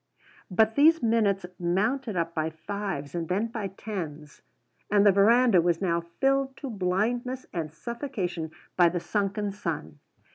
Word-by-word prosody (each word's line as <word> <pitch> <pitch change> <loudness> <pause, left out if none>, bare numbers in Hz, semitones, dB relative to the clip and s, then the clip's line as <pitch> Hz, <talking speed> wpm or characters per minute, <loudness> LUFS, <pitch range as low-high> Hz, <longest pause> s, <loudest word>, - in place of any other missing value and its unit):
But 220 +4 +3
these 320 +3 +5
minutes 210 -5 +2
mounted 215 +7 0
up 165 0 -1
by 160 -1 -1
fives 170 -3 -5
and 170 -2 -3
then 205 +5 0
by 220 -3 -3
tens. 165 -7 -7 0.5
And 205 0 +4
the 205 - +8
verandah 215 0 +5
was 170 -1 +1
now 170 -3 +1 0.2
filled 270 0 +1
to 275 -4 -6
blindness 230 +7 -1
and 160 -4 -3
suffocation 180 - -4 0.3
by 175 -2 +5
the 175 +1 -2
sunken 200 +3 -1
sun. 155 - -5
195 Hz, 145 wpm, -27 LUFS, 170-230 Hz, 0.5 s, the